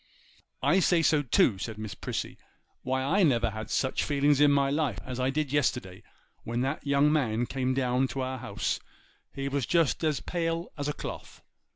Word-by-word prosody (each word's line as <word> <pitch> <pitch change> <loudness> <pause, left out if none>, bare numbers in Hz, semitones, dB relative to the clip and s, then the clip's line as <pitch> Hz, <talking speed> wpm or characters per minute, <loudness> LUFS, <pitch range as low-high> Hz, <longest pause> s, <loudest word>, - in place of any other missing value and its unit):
'I 190 - +4
say 175 -2 +3
so 155 -2 +4
too,' 115 -6 +3
said 110 +2 -5
Miss 110 -1 -6
Prissy: - - -5 0.4
'why 130 0 -1
I 180 +9 +2
never 120 - +3
had 110 +1 -6
such 130 - 0
feelings 145 0 +2
in 145 - +7
my 140 -1 +2
life 145 -8 0
as 130 -1 -5
I 130 +1 +1
did 145 0 -1
yesterday 125 -10 0 0.4
when 120 +1 -2
that 135 +3 -2
young 140 +2 +4
man 120 -6 +1
came 130 0 -1
down 130 0 +1
to 135 - -4
our 130 0 -3
house; 110 -5 -2 0.5
he 135 0 -4
was 140 -3 -1
just 165 -2 +2
as 155 -3 +1
pale 165 0 -2
as 145 -1 -3
a 150 - -1
cloth. - - -8
135 Hz, 190 wpm, -28 LUFS, 125-150 Hz, 0.5 s, in